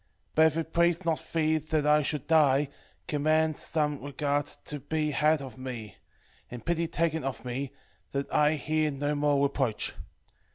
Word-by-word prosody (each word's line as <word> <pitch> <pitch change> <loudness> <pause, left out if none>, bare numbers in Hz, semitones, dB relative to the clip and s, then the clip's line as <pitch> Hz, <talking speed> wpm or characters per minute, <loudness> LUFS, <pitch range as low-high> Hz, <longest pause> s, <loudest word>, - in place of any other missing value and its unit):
but 160 0 +6
if 160 0 -1
it 160 0 -3
please 170 +1 +2
not 165 -2 0
thee 160 -1 +2
that 155 0 -1
I 150 0 +5
should 150 -1 -2
die, 145 -3 +4 0.4
command 155 +1 +2
some 150 -3 -1
regard 145 +1 -1 0.2
to 150 - -4
be 150 +2 -1
had 150 0 +2
of 130 -1 -9
me, 120 -6 -7 0.5
and 120 -1 -9
pity 170 0 0
taken 160 -1 0
of 135 -1 -4
me, 130 +2 -3 0.4
that 140 0 -2
I 150 +1 +4
hear 155 +1 0
no 145 +1 -1
more 145 -1 +2
reproach. 135 -5 0
150 Hz, 165 wpm, -29 LUFS, 140-160 Hz, 0.5 s, but